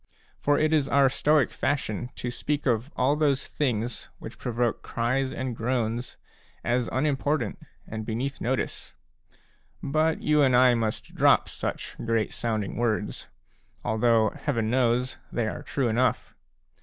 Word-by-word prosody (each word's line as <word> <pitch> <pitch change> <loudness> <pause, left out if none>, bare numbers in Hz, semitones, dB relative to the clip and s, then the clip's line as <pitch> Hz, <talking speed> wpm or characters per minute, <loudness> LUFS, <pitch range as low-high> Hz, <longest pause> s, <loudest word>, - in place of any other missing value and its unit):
For 145 0 +2
it 155 +1 +2
is 150 -3 +3
our 140 -1 +5
Stoic 150 +1 +2
fashion 125 -4 -2
to 120 - -4
speak 145 +4 -2
of 120 0 +1
all 135 +3 +2
those 145 -3 +1
things, 120 -4 -2
which - - -10
provoke 120 -1 -1
cries 130 +3 -1
and 130 -2 -3
groans, 120 0 -2 0.5
as 120 0 0
unimportant 140 -3 0 0.3
and 110 0 -5
beneath 120 +5 -3
notice; 130 +2 -2 0.9
but 155 +3 +1
you 150 -1 +3
and 130 -3 +4
I 125 0 +6
must 110 -2 -2
drop - - +4
such - - -4
great 115 -2 0
sounding 110 -4 -2
words, 110 -3 -1 0.6
although, 110 -1 +3
Heaven 115 -7 -1
knows, 125 0 +1
they 120 -2 0
are - - -4
true 135 -3 -1
enough. 120 +1 +1
125 Hz, 140 wpm, -27 LUFS, 115-140 Hz, 0.9 s, I